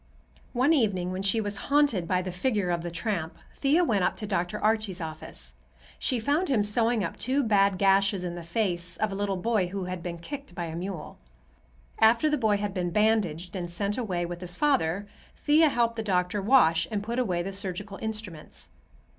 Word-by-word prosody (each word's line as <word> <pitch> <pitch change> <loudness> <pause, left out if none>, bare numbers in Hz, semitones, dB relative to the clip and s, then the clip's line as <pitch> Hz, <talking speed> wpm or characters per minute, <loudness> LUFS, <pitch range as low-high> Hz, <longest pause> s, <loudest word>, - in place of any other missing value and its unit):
One 260 +6 +3
evening 195 - +1
when 185 +1 -3
she 200 +3 +1
was 205 -2 -1
haunted 280 -12 +3
by 185 0 +1
the 185 - -4
figure 195 0 0
of 170 -1 0
the 175 - -4
tramp, 170 -1 -3 0.2
Thea 295 +6 +3
went 210 - +1
up - - +1
to 215 - -5
Dr. 190 0 -1
Archie's 215 -3 +1
office. 155 - -7 0.5
She 250 - 0
found 290 +10 +1
him 230 -7 +3
sewing 225 +1 +2
up 170 - -4
two 270 +3 +1
bad 200 -4 +3
gashes 195 0 +3
in 175 -1 -3
the 175 - -6
face 175 0 -2
of 215 -1 0
a - - -4
little 200 -1 -1
boy 215 -1 +1
who 195 +1 -4
had 180 -1 -5
been 170 0 -5
kicked 280 - -8
by 175 - -3
a 160 -1 -6
mule. 180 -1 -6 0.8
After 230 +7 +5
the - - +3
boy 215 -3 +2
had 205 -1 -3
been 180 -2 -1
bandaged 185 -4 +1
and 175 -2 -4
sent 200 +4 -2
away 185 -8 -2
with 175 0 -6
his 175 -1 -2
father, 205 - +1 0.3
Thea 305 +1 +4
helped 235 -3 +1
the - - -1
doctor 185 -1 0
wash 170 -8 +4
and 205 -2 -2
put 235 +3 -2
away 180 -8 0
the 195 +2 -5
surgical 195 0 -5
instruments. 215 -8 -6
200 Hz, 200 wpm, -27 LUFS, 175-225 Hz, 0.8 s, After